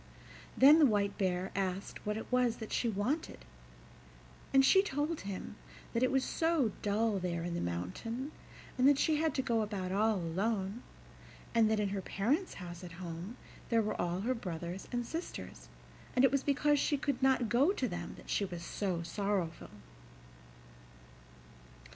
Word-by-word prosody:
Then 290 +4 +8
the 310 - +7
White 205 -3 +1
Bear 185 -1 0
asked 195 +1 -3
what 210 0 0
it 220 - -5
was 250 -2 +3
that 220 - -8
she 235 - +1
wanted, 210 - -2 1.1
and 270 0 +6
she 385 +7 +7
told 310 -3 -2
him 195 -2 -6 0.4
that 230 - 0
it 255 - +4
was 265 -1 +2
so 320 -9 +1
dull 210 0 +1
there 170 -2 -2
in 175 0 -3
the 170 - -2
mountain, 95 - -4 0.5
and 255 - +6
that 285 - +4
she 310 +1 +2
had 315 -2 0
to 265 - 0
go 230 -3 +1
about 200 -4 -3
all 215 +3 +2
alone, 195 +5 -1 0.7
and 225 -2 +4
that 220 -1 +2
in 205 -1 +1
her 195 0 -2
parents' 260 - 0
house 175 -1 -8
at 175 -2 -8
home 175 +5 -7 0.3
there 230 -1 +3
were 215 - -2
all 175 +1 -1
her 245 +5 +1
brothers 175 -4 -5
and 240 -1 -1
sisters, 95 - -6 0.5
and 250 - +6
it 265 - +4
was 275 -1 +2
because 290 +1 +2
she 290 - +1
could 280 -2 -2
not 260 -3 +3
go 255 - +4
to 265 -10 -1
them 175 -4 -5
that - - -14
she - - 0
was 175 -3 -5
so 180 -4 -2
sorrowful. 185 -2 -2
215 Hz, 170 wpm, -33 LUFS, 185-265 Hz, 1.1 s, Then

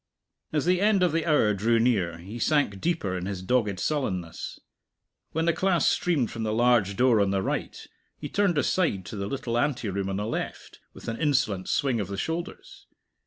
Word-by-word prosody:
As 150 -1 0
the 180 +1 +2
end 205 -2 +4
of 180 - +3
the 165 +1 -1
hour 130 -9 +4
drew 115 +4 +2
near, 100 -8 +1
he 100 +8 -8
sank 140 -9 +1
deeper 160 - -1
in 90 0 -4
his 95 -2 -4
dogged 105 -3 +1
sullenness. 95 - -3 0.7
When 160 +1 0
the 170 - +3
class 180 +1 +2
streamed 150 -11 +1
from 115 - -5
the 110 -1 -1
large 115 -4 +3
door 120 -2 +4
on 100 - +2
the 95 -1 0
right, - - -3 0.4
he - - -6
turned 200 -5 +1
aside 145 - +1
to - - -7
the 100 -1 -3
little 120 0 -2
anteroom 105 -9 -1
on 95 - -2
the 105 +1 -2
left, 115 - -5 0.2
with - - -11
an 115 +5 -4
insolent 125 - +1
swing 130 -5 +1
of 100 - -2
the 100 +1 -5
shoulders. 170 - -5
115 Hz, 195 wpm, -26 LUFS, 100-155 Hz, 0.7 s, end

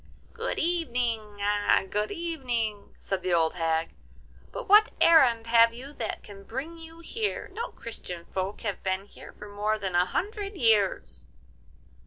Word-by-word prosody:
'Good 465 +1 -3
evening! 240 -11 -1 0.5
good 210 +1 0
evening!' 245 -11 -3
said 195 -1 -3
the 180 -2 +1
old 160 -1 +2
hag; 165 -1 -1 0.6
'but - - -6
what 420 +2 +7
errand 255 -9 +6
have 230 0 +5
you 270 +4 -9
that 225 -6 -4
can 195 -1 -12
bring 275 +10 -6
you 325 0 -11
here? 425 +5 -3
No 465 +4 -3
Christian 180 -7 -8
folk 190 +2 -3
have 205 -5 -3
been 190 +1 -1
here - - -13
for 210 - -11
more 210 +1 -1
than 190 -3 -4
a 175 +1 +4
hundred 405 - -3
years. 220 - +1
230 Hz, 150 wpm, -27 LUFS, 200-325 Hz, 0.6 s, what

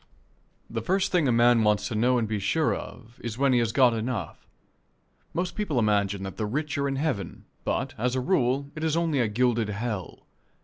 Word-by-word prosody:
The 115 0 -4
first 190 - 0
thing 175 -6 +3
a - - +3
man 120 0 +5
wants 105 -1 +2
to - - -4
know 125 +4 +2
and 115 -2 0
be 105 -1 -2
sure 155 +10 +1
of 115 +2 -9
is 115 -1 -4
when 135 0 +3
he 125 - +4
has 115 -2 +1
got 125 0 +4
enough. 110 -6 -4 0.8
Most 180 +1 -2
people 200 -10 -2
imagine 100 -3 +1
that 95 -1 -6
the 110 - -1
rich 150 +6 -2
are 140 - +1
in 135 - -1
heaven, 135 - -3 0.2
but, - - -1
as 125 +2 0
a - - +1
rule, 135 -1 +1
it 155 - -6
is 160 0 +1
only 165 -4 +1
a 120 - +2
gilded 115 0 +1
hell. 105 -2 -4
120 Hz, 210 wpm, -26 LUFS, 110-140 Hz, 0.8 s, man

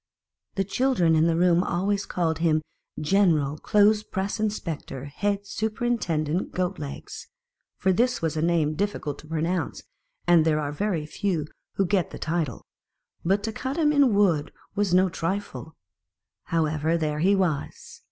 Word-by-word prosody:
The 195 - +1
children 195 -5 +2
in 160 +1 +4
the 165 - +2
room 175 0 +4
always 195 +2 -1
called 165 -3 -1
him 155 -2 +2 0.4
General 155 -4 +2
clothes 210 +1 +4
press 195 0 -3
inspector 170 -10 -3
head 200 +7 -2
superintendent 200 -8 -1
Goat 185 +1 -1
legs, 145 -2 -7 0.5
for 190 -1 +2
this 245 +6 +2
was 160 -2 -1
a 155 - -1
name 165 -2 +2
difficult 155 -5 -2
to 155 - -13
pronounce, 165 +1 -2 0.4
and 175 -2 +5
there 155 -1 +2
are 145 -1 -2
very 170 -1 -1
few 170 -1 -2 0.3
who 195 - +2
get 185 -1 +1
the - - -8
title: 155 -7 -2 0.6
but 195 +4 +1
to 225 - -2
cut 260 +6 -4
him 305 -3 +3
out - - 0
in 265 -7 +5
wood 175 -8 +3
that - - -20 0.2
was 205 -2 0
no 185 +1 +5
trifle. 165 -6 -4 0.7
However, 160 0 +1
there 150 -2 -1
he 195 +5 +4
was. 175 -7 -2
175 Hz, 160 wpm, -25 LUFS, 155-200 Hz, 0.7 s, and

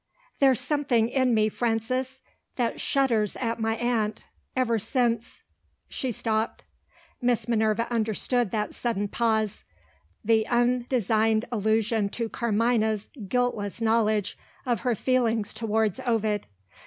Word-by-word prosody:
"There's 265 -4 +4
something 270 -7 +1
in 255 -2 +2
me, 215 0 +3
Frances, 250 +4 -2 0.3
that 240 -2 -1
shudders 235 -7 +1
at 230 -2 -2
my 225 0 0
aunt, 225 -3 -1 0.3
ever 235 -3 +1
since 235 +1 -1 0.2
" - - -44
She 260 - -3
stopped. 220 0 -2 0.6
Miss 245 -1 +1
Minerva 220 -1 +1
understood 230 +1 +1
that 210 +1 -2
sudden 205 -4 -1
pause 220 -1 0 0.6
the 220 0 +3
undesigned 240 -3 +2
allusion 220 -1 +1
to 230 -1 -2
Carmina's 220 -2 0 0.2
guiltless 230 -2 -1
knowledge 220 -3 +1 0.3
of 240 -4 0
her 245 +2 0
feeling 230 -2 +1
towards 220 -1 -1
Ovid. 220 -4 0
225 Hz, 115 wpm, -26 LUFS, 215-245 Hz, 0.6 s, There's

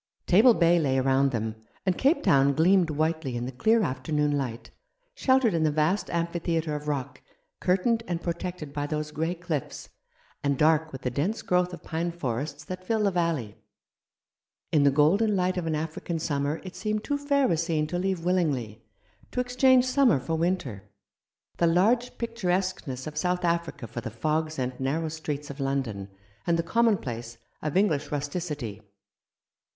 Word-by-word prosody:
Table 220 +6 +6
Bay 170 0 +4
lay 135 -4 +1
around 135 +1 +3
them, 110 -3 -2 0.3
and 185 -2 +2
Cape 280 - +2
Town 140 -6 +4
gleamed 175 +1 +4
whitely 155 -4 -1
in 120 - -3
the 130 - -4
clear 220 - +3
afternoon 145 +2 0
light, 120 -5 -4 0.4
sheltered 260 - +3
in 165 - +1
the 155 - +3
vast 155 +7 +1
amphitheatre 170 -2 -1
of 150 0 -6
rock, 140 -4 -3 0.4
curtained 210 +6 +2
and 175 -2 -2
protected 170 -3 -5
by 145 0 -2
those 150 0 -3
grey 160 +3 -2
cliffs, 165 -5 -4 0.5
and 140 -1 +1
dark 155 +1 +3
with 130 -1 -8
the 125 - -1
dense 170 - -1
growth 180 0 +1
of 175 - -9
pine 170 +1 -2
forests 145 -1 -4
that 185 +4 -7
fill 220 +3 0
the 200 - +3
valley. 165 - -1 1.1
In 150 - +4
the 140 - +6
golden 180 +10 +3
light 185 0 +1
of 175 -3 -2
an 160 - 0
African 160 +2 -3
summer 145 -1 -1
it 185 -1 -9
seemed 215 -1 -2
too 285 -1 -1
fair 280 -2 +2
a - - +3
scene 160 -1 0
to 175 +3 -3
leave 185 -2 -1
willingly, 135 - 0 0.5
to - - -3
ex 250 0 -3
change 260 -1 +5
summer 255 - +4
for 135 +5 -4
winter, 160 - -2 0.7
the 170 - +3
large 220 +9 +2
picturesqueness 185 - -2
of 150 -1 -7
South 180 +1 0
Africa 170 -6 -1
for 120 - -6
the 115 - -5
fogs 155 +7 -1
and 130 -1 -3
narrow 155 +5 -1
streets 150 -2 -5
of 140 - -11
London, 130 -8 -2 0.4
and 170 -1 +3
the 165 - 0
commonplace 135 - 0 0.2
of 150 +2 -1
English 160 -8 +1
rusti 145 +3 -2
city. 135 - -5
160 Hz, 175 wpm, -27 LUFS, 140-185 Hz, 1.1 s, Table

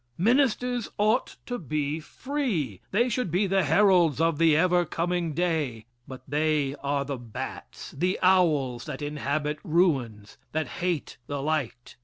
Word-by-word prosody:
Ministers 245 +2 +2
ought 215 +4 +1
to 245 0 -4
be 150 -1 -2
free. 180 - -3
They 235 +5 +2
should 250 -4 -1
be 180 +5 +1
the 195 0 +2
heralds 170 -2 +4
of 165 -2 +1
the 160 -2 +5
ever 175 +1 +3
coming 170 -1 -2
day, 155 -10 -1 0.2
but 130 -2 -9
they 150 -1 +1
are 140 0 -1
the 140 -1 -4
bats, 115 -3 -8
the 180 +6 0
owls 150 -10 +3
that - - -6
inhabit 150 +1 -2
ruins, 135 - 0
that 155 0 -1
hate 175 -4 -2
the 145 -1 -3
light. 140 -5 -3
160 Hz, 145 wpm, -27 LUFS, 140-185 Hz, 0.2 s, the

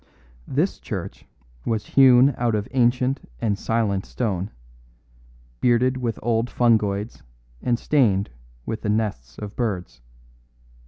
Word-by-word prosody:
This - - 0
church - - -6 0.4
was 110 -2 -1
hewn 130 0 +7
out 120 -2 0
of 105 -1 -2
ancient 125 - +1
and 105 -3 0
silent 105 -2 0
stone, 100 -5 -2 1.1
bearded 125 +1 +3
with 120 -3 -2
old 115 +1 +1
fungoids 110 -4 +1 0.4
and 120 -1 +1
stained 105 - +2 0.3
with 110 - -4
the 105 - -2
nests 95 - -2
of 105 0 -7
birds. 90 - -3
115 Hz, 115 wpm, -23 LUFS, 100-120 Hz, 1.1 s, hewn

